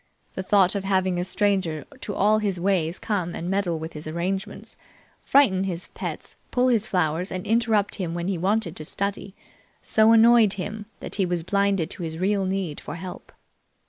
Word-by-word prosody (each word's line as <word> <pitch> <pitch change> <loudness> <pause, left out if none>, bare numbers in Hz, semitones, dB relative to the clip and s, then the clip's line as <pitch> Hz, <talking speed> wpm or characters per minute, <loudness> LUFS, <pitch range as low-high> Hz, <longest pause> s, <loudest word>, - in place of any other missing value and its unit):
The - - -4
thought 190 -1 +3
of 200 -2 -2
having 190 -2 +1
a - - 0
stranger 190 -5 0
to 205 - -5
all 215 +2 +3
his 200 -4 -1
ways 175 -2 0
come 185 -6 -2
and 175 +2 -4
meddle 190 -4 0
with 160 +1 -7
his 150 0 -8
arrangements, 180 +4 -4 0.5
frighten 195 -9 +4
his 180 -2 -4
pets, - - -6
pull 250 0 +2
his 220 -3 +2
flowers, 175 0 0
and 185 -1 -4
interrupt 220 -2 +2
him 175 -4 -3
when 170 0 -3
he 195 - 0
wanted 195 -1 0
to 155 - -6
study, 200 +3 -3 0.5
so 220 +1 +4
annoyed 230 -2 +6
him 205 +2 -6
that - - -6
he 195 - +2
was 175 -2 -1
blinded 200 -2 +1
to - - -4
his 160 -1 -4
real 195 +2 +1
need 190 -5 -3
for - - -7
help. 180 +2 -8
190 Hz, 185 wpm, -24 LUFS, 175-205 Hz, 0.5 s, annoyed